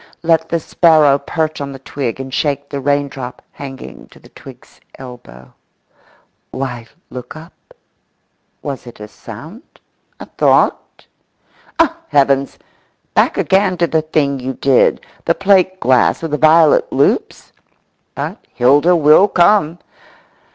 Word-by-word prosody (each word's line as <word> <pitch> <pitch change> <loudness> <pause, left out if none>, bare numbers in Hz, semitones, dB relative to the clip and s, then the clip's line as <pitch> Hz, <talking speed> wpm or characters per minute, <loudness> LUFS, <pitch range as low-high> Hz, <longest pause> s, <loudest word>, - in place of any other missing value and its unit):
Let 160 -1 +1
the 170 - 0
sparrow 155 -4 +3
perch 155 +2 -3
on 140 -1 -5
the - - -9
twig 135 -2 -5
and 135 0 -7
shake 140 -1 -2
the 140 - -5
raindrop 140 -2 -3
hanging 135 -2 -10
to - - -20
the - - -19
twig's - - -16 0.2
elbow.… 65 - -13 1.0
Why 125 -3 -6 0.2
look 125 +3 -9
up? 160 +3 -13 1.1
Was 135 -3 -6
it 120 - -12
a 105 - -9
sound, 150 - -12 0.6
a - - -8
thought? - - 0 0.7
Oh, 330 0 +2
heavens! 140 -1 +1 0.6
Back - - +2
again 190 -1 +1
to 170 - +2
the 160 -1 0
thing 145 -3 -1
you 130 +1 -4
did, 135 -1 +2 0.2
the - - +1
plate 190 -1 +2
glass 130 +3 +2
with 165 - -4
the 150 - 0
violet 155 0 +4
loops? - - -1 0.6
But - - -6
Hilda 145 +8 +4
will 155 +5 +5
come. 175 -3 +2
145 Hz, 130 wpm, -16 LUFS, 130-165 Hz, 1.1 s, will